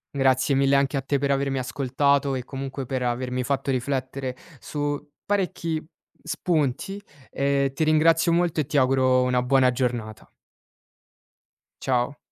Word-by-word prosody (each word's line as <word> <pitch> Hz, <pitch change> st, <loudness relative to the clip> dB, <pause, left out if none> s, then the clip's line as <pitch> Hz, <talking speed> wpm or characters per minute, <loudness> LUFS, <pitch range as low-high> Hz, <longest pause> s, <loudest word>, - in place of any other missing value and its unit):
Grazie 130 Hz, 0 st, +3 dB
mille 135 Hz, 0 st, +4 dB
anche 140 Hz, +1 st, +1 dB
a 135 Hz, -, 0 dB
te 140 Hz, +2 st, 0 dB
per 140 Hz, 0 st, 0 dB
avermi 135 Hz, -1 st, 0 dB
ascoltato 140 Hz, +2 st, +1 dB
e 125 Hz, 0 st, -4 dB
comunque 135 Hz, 0 st, -5 dB
per 130 Hz, 0 st, -2 dB
avermi 125 Hz, +1 st, -1 dB
fatto 140 Hz, +1 st, -2 dB
riflettere 130 Hz, 0 st, -2 dB, 0.3 s
su 145 Hz, 0 st, -4 dB
parecchi 180 Hz, -6 st, -1 dB, 0.4 s
spunti 165 Hz, +4 st, -1 dB, 0.3 s
e 140 Hz, -1 st, +1 dB
ti 155 Hz, -, 0 dB
ringrazio 165 Hz, +2 st, +4 dB
molto 170 Hz, -2 st, +2 dB
e -, -, -3 dB
ti 145 Hz, +2 st, -1 dB
auguro 130 Hz, -1 st, +3 dB
una 125 Hz, -1 st, +1 dB
buona 130 Hz, 0 st, +4 dB
giornata. 120 Hz, -4 st, -3 dB, 1.5 s
Ciao. 130 Hz, +2 st, 0 dB
135 Hz, 135 wpm, -24 LUFS, 130-145 Hz, 1.5 s, mille